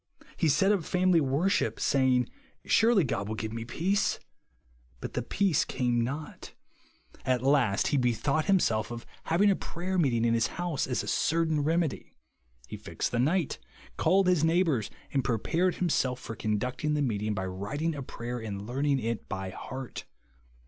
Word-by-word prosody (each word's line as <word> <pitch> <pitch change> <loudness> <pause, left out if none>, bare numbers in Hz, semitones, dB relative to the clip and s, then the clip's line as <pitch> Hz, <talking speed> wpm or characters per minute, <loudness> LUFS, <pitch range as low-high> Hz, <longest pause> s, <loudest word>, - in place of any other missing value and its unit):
He 160 - +1
set 180 +8 +4
up 200 -5 +1
family 180 0 +3
worship, 160 +9 +1
saying, 130 -2 +2 0.4
Surely 225 -4 +4
God 105 -7 -2
will 110 - -3
give 110 0 -4
me 115 0 -4
peace. 175 - 0 0.8
But - - -6
the - - -1
peace 195 -7 +1
came 120 -2 0
not. 140 +6 -2
so - - -8
GROUND - - -13
OF - - -26
PEACE. - - -18
15 130 - 0
At 125 - -5
last 135 -8 +3
he 145 - +2
bethouglit 130 +5 +1
himself 115 - +2
of 120 -1 -7 0.2
having 195 +5 +4
a - - +2
prayer 185 +2 -3
meeting 120 -7 +2
in 115 - +3
his 115 -1 +2
house 175 -5 -1
as 125 - -1
a - - -8
certain 160 -1 +1
remedy. 160 0 -1 0.5
He - - -7
fixed - - -4
the 120 - 0
night; 160 +5 +1 0.4
called 195 +1 +3
his 180 -4 +3
neighbours; 160 - +2 0.2
and 135 -2 +1
prepared 165 - 0
himself 130 -8 0
for 115 - -7
con 105 -1 -1
ducting 130 +6 -2
the 145 - +1
meeting, 105 -4 -1
by 95 -2 -2
writing 100 - -3
a 145 - -5
prayer 120 -1 -5
and 100 -3 -5
learning 140 +4 0
it 115 -2 -3
by 95 0 -4
heart. 130 +5 -7
135 Hz, 185 wpm, -29 LUFS, 115-165 Hz, 0.8 s, set